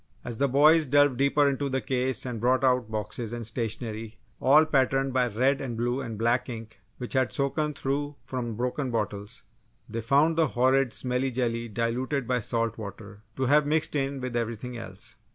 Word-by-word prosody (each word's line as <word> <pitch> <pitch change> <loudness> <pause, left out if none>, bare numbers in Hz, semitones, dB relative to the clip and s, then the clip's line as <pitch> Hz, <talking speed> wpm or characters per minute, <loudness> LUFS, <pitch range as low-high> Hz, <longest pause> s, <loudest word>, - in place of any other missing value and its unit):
As 120 -2 -5
the 140 - +3
boys 150 +4 +5
delved 145 -1 +4
deeper 140 +2 +3
into 140 0 -1
the 135 0 0
case 130 0 -1
and 120 -3 -4
brought 130 +2 +2
out 125 -3 +2
boxes 110 +1 -4
and 120 -1 -5
stationery 115 -1 -4 0.2
all 150 +4 +6
patterned 135 -2 +1
by 125 -1 +2
red 130 +5 +1
and 120 -4 -4
blue 120 +3 -1
and 115 -4 -6
black 120 +4 +1
ink 115 -2 -8 0.2
which 125 - -4
had 130 -2 +2
soaken 150 +2 -1
through 145 +2 -2
from 120 -4 -4
broken 125 +3 -2
bottles, 105 -1 -4 0.4
they 115 +1 -4
found 145 +7 +3
the 165 -2 +4
horrid 130 0 +3
smelly 125 +2 -1
jelly 120 -2 -1
diluted 120 +4 -2
by 125 -1 +1
salt 115 0 -1
water, 105 -1 -9
to 130 - -2
have 145 +3 +4
mixed 155 +1 0
in 135 -1 -1
with 125 -2 -4
everything 115 +1 -3
else. 115 - -8
125 Hz, 185 wpm, -27 LUFS, 115-135 Hz, 0.4 s, all